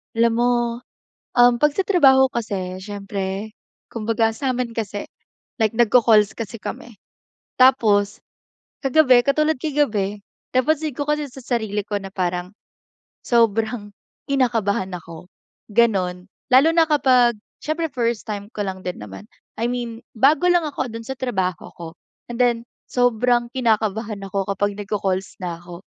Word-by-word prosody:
Alam 230 0 +3
mo, 245 +1 +3 0.8
um, 245 0 +5
pag 295 +3 +2
sa 390 - +1
trabaho 265 -9 +5
kasi 195 -6 -4
siyempre, 195 +1 -5 0.4
kumbaga 225 0 0
samin 250 0 -2
kasi, 210 -3 -4 0.6
like 220 -1 +1
nag-ccalls 225 -2 +4
kasi 230 -1 -6
kami. 235 - -7 0.6
Tapos, 215 -6 +4 0.7
kagabi, 260 -3 +5
katulad 305 +2 +2
kagabi, 220 -9 -1 0.3
napansin 305 +3 +1
ko 290 +4 -4
kasi 300 0 0
sa 265 - -10
sarili 220 -4 -2
ko 205 0 -3
na 195 -1 -9
parang, 180 0 -2 0.7
sobrang 225 -2 +1 0.4
kinakabahan 225 -8 0
ako, 170 0 -9 0.4
ganon. 190 -5 +1 0.2
Lalo 265 +5 +7
na 330 - +6
kapag, 255 -7 +3 0.3
siyempre 325 +2 -1
1st 235 -5 -2
time 205 -1 -5
ko 210 - -7
lang 190 -1 -6
din 180 - -5
naman. 95 -1 -9 0.3
I 235 - -1
mean, 235 -2 -5
bago 280 +9 +3
lang 345 -3 +2
ako 260 -4 -4
dun 230 0 -8
sa 265 - -4
trabaho 190 -9 -3
ko, 170 - -9 0.4
and 240 - -6
then, 240 -1 +1 0.2
sobrang 245 0 +2
kinakabahan 220 -3 0
ako 195 0 -1
kapag 205 +1 -1
nagko-calls 195 -2 -3
na 175 -2 -4
ako. 175 0 -11
230 Hz, 135 wpm, -21 LUFS, 200-255 Hz, 0.8 s, Lalo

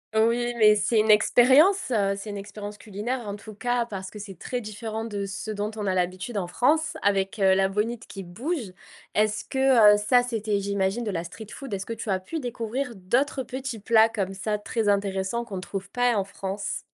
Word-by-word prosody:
Oui 235 +2 +2
mais 210 -1 +6
c'est 220 +2 +2
une 215 0 +4
expérience, 265 - +5
heu, 200 -4 +2
c'est 200 +2 -7
une 205 - -5
expérience 205 +1 -7
culinaire 220 +3 -4
en 200 - -4
tout 215 +1 -11
cas 245 +2 0
parce 190 -4 -6
que 210 - -10
c'est 195 -4 -9
très 250 -1 -3
différent 215 +1 -5
de 205 -3 -3
ce 195 +2 -5
dont 210 0 -2
on 210 -2 -4
a 190 - +1
l'habitude 185 +5 -2
en 180 -3 -1
France 295 - +2
avec, 195 +1 +1
heu, 190 -1 +5
la 190 0 +3
bonite 215 +4 -2
qui 195 - -8
bouge. 230 - -4 0.4
Est-ce 215 0 +1
que, 260 -6 +5
heu, - - +1
ça 245 +4 +3
c'était 215 -4 -1
j'imagine 200 +3 -1
de 210 - -2
la 170 -1 -3
street 215 +5 -9
food? 270 -6 -8
Est-ce 195 0 -3
que - - -7
tu 225 -1 -5
as 190 -1 +1
pu 320 - -5
découvrir 245 0 -3
d'autres 255 +8 0
petits 260 -2 -5
plats 220 +2 +5
comme 200 -4 -3
ça 210 +2 -2
très 210 +1 -2
intéressants 200 +2 0
qu'on 205 -5 -7
ne - - -4
trouve 195 +1 -6
pas 245 +1 +2
en 200 - +1
France? 195 +1 -4
210 Hz, 215 wpm, -26 LUFS, 195-240 Hz, 0.4 s, mais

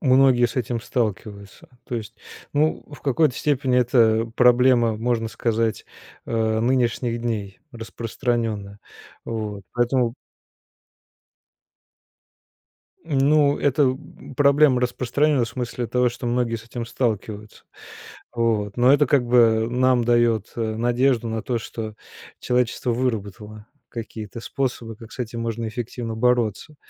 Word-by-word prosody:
многие 130 -3 +4
с 115 - -8
этим 120 -2 -2
сталкиваются, 105 -4 -4 0.2
то 120 - -4
есть, 110 0 -7 0.4
ну, 155 +2 +1
в 145 - -12
какой-то 140 0 +2
степени, 135 -2 0
это 115 -2 +3
проблема, 125 -2 +4
можно 115 0 -1
сказать, 115 0 -1 0.4
э, 110 -1 0
нынешних 120 -1 0
дней, 105 -5 -4
распространенная. 115 -3 -3 0.5
Вот. 105 -3 -5
Поэтому 120 -1 +1 2.9
М, 145 -4 -1
ну, 145 +1 +3
это 140 -2 +2 0.4
проблема 140 -2 +4
распространенная 130 +2 +1
в - - -7
смысле 120 0 -4
того, 125 +2 +2
что 120 +1 -7
многие 120 -1 0
с 115 - -11
этим 120 0 -6
сталкиваются. 110 -3 -3 0.7
Вот. 110 -4 0
Но 125 +2 +5
это 145 0 +4
как 125 -2 +2
бы 115 -2 +4
нам 125 -1 +2
дает, 120 -3 +2
э, - - -3 0.2
надежду 120 +1 +1
на 110 -1 -3
то, 120 -2 -1
что 110 -1 -6 0.4
человечество 125 0 0
выработало 110 -3 -4 0.2
какие-то 110 -1 -7
способы, 120 -2 -3
как 115 0 -13
с - - -12
этим 115 -1 -4
можно 115 0 -3
эффективно 115 0 -5
бороться. 125 - 0
120 Hz, 125 wpm, -23 LUFS, 110-125 Hz, 2.9 s, Но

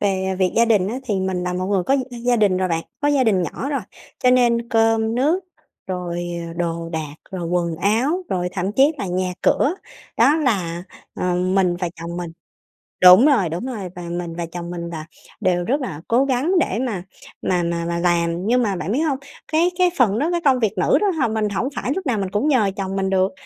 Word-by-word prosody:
về 190 -2 0
việc 185 -1 +2
gia 230 - +6
đình 210 -5 +2
á, 245 +5 -3
thì 215 -5 -1
mình 185 -1 -1
là 180 0 -2
một 185 +1 -2
người 195 -2 +1
có 270 +8 +2 0.3
gia 245 -1 +3
đình 200 -4 +3
rồi 185 0 0
bạn, 165 -1 -1 0.2
có 290 - +2
gia 280 -3 +3
đình 195 -5 +2
nhỏ 235 - -4
rồi, 280 -4 -1 0.4
cho 250 - +5
nên 235 -2 +3
cơm 225 0 +2
nước 310 +9 +1 0.4
rồi, 175 -2 -4 0.2
ờ, - - -7
đồ 170 -1 -3
đạc, 155 -3 -5 0.2
rồi 180 -3 -4
quần 170 -2 0
áo, 240 - +1
rồi 180 -1 -1
thậm 190 +1 -2
chí 275 +7 +4
là 200 - -3
nhà 180 0 -1
cửa 310 +6 +3 0.4
đó 300 - +5
là, 185 - -1 0.3
ờ, 180 -1 -1
mình 180 0 +1
và 175 -1 -2
chồng 170 +1 -5
mình 175 -2 -4 0.7
đúng 185 +7 +9
rồi, 230 - +3
đúng 175 +9 -4
rồi. 210 -8 -5
Và 180 - -7
mình 170 -1 -5
và 170 0 -3
chồng 170 +1 -7
mình 170 -1 -5
là 155 -2 -6 0.4
đều 175 -1 +1
rất 270 +9 0
là 160 - -5
cố 245 +4 +3
gắng 275 +6 0
để 230 - 0
mà 220 -9 -2 0.4
mà 180 -1 0
mà 170 0 -2
mà 170 0 -2
làm. 170 +1 +1
Nhưng 245 +2 +3
mà 205 -4 0
bạn 175 +1 -3
biết 255 - +1
hông, 290 -5 0 0.3
cái 340 +3 +3
cái 365 -1 +4
phần 220 -4 +3
đó, 315 +6 +1
cái 345 - 0
công 260 -2 +4
việc 215 -3 0
nữ 180 - +3
đó 410 - +3
h 265 -9 0
mình 215 -1 0
hổng 205 +6 -1
phải 255 - -2
lúc 380 -3 -4
nào 245 -5 0
mình 195 -2 -2
cũng 210 +9 0
nhờ 225 -9 +3
chồng 195 0 -3
mình 190 0 0
được, 190 0 +2
195 Hz, 235 wpm, -21 LUFS, 175-245 Hz, 0.7 s, đúng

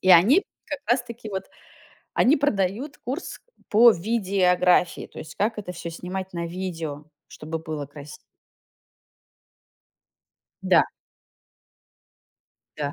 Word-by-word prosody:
и 185 - +3
они 200 - +7 0.2
как 290 - -4
раз 245 +1 +3
таки 235 -2 -9
вот, 190 -1 -3 0.7
они 275 +6 +5
продают 255 0 -1
курс 265 +8 -5 0.3
по 235 +2 +8
видеографии, 185 -4 +2
то - - -13
есть 155 -1 -9
как 220 +2 0
это 195 -4 -5
всё 170 -1 -6
снимать 185 +3 -5
на 170 -1 -3
видео, 165 -4 -5 0.2
чтобы 160 +1 -6
было 155 -3 -5
краси 145 +1 -11 2.5
Да. - - +5 1.9
Да. 145 -1 -2
185 Hz, 110 wpm, -25 LUFS, 165-230 Hz, 2.5 s, по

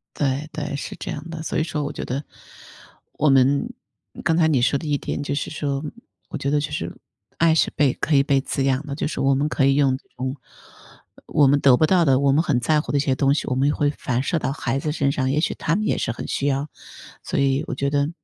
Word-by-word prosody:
对 145 +2 -1
对， 150 -2 -4
是 - - -6
这 - - -6
样 155 +3 -7
的。 160 -1 -6
所 160 - -2
以 - - +2
说 155 -3 -3
我 145 - -3
觉 - - -6
得， 135 +4 -3 0.9
我 150 - +2
们 135 +1 +3 0.5
刚 160 0 +2
才 160 -2 +4
你 135 -6 +2
说 140 +2 +2
的 155 - -7
一 145 -1 +1
点， 145 - -4
就 145 0 -2
是 145 - -3
说， 145 -2 -2 0.5
我 - - -4
觉 140 - -2
得 145 0 +2
就 - - -4
是， - - -4 0.4
爱 165 -1 +4
是 160 - +3
被 140 -3 +3
可 155 - 0
以 140 - +5
被 140 -1 +2
滋 135 0 -2
养 135 +2 0
的， 140 - -4
就 - - -2
是 - - -5
我 135 0 +3
们 145 +2 0
可 135 - +1
以 135 0 +4
用 135 -2 +3
这 - - -25
种 130 +2 -4 0.9
我 145 - +3
们 140 +1 +4
得 135 -3 +6
不 155 - +3
到 175 -1 +3
的， 135 -2 +4
我 140 -1 +3
们 150 +3 +3
很 135 -8 0
在 150 +5 +2
乎 150 - -4
的 - - +3
一 - - +2
些 135 -2 +1
东 135 +1 +2
西， - - -2
我 130 - 0
们 135 +2 +2
也 145 - +2
会 145 - +1
反 130 -3 -2
射 165 - 0
到 135 - -2
孩 135 -2 -2
子 150 +1 -2
身 140 -3 +1
上， 130 -2 -1
也 150 +3 +1
许 - - 0
他 165 - -1
们 215 +2 -1
也 - - +1
是 120 - -1
很 - - -7
需 140 - -1
要。 140 +1 -1 0.5
所 - - -4
以 135 0 +1
我 - - -3
觉 140 +1 -1
得， 145 +1 +1
140 Hz, 290 characters per minute, -22 LUFS, 135-150 Hz, 0.9 s, 得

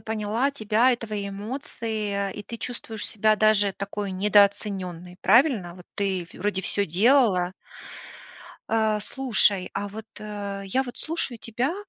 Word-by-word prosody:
поняла 220 +5 -1
тебя 230 +1 +3
и - - 0
твои 210 -3 -4
эмоции, 210 -2 -3
и 205 - -7
ты 230 - -7
чувствуешь 225 -3 -5
себя 215 0 +2
даже 210 -2 +3
такой 200 -1 -4
недооцененной, 190 -3 +1
правильно? 215 - +4
Вот 180 - -13
ты 190 -3 0
вроде 195 0 -2
всё 200 +2 0
делала. 190 - +3 1.1
А, 220 -1 +1
слушай, 210 -6 +1
а 205 +1 -2
вот, 220 +2 -8
э, 205 -2 -5
я 225 +8 +1
вот 245 -2 -8
слушаю 315 -7 -2
тебя, 240 - -2
210 Hz, 135 wpm, -25 LUFS, 200-230 Hz, 1.1 s, правильно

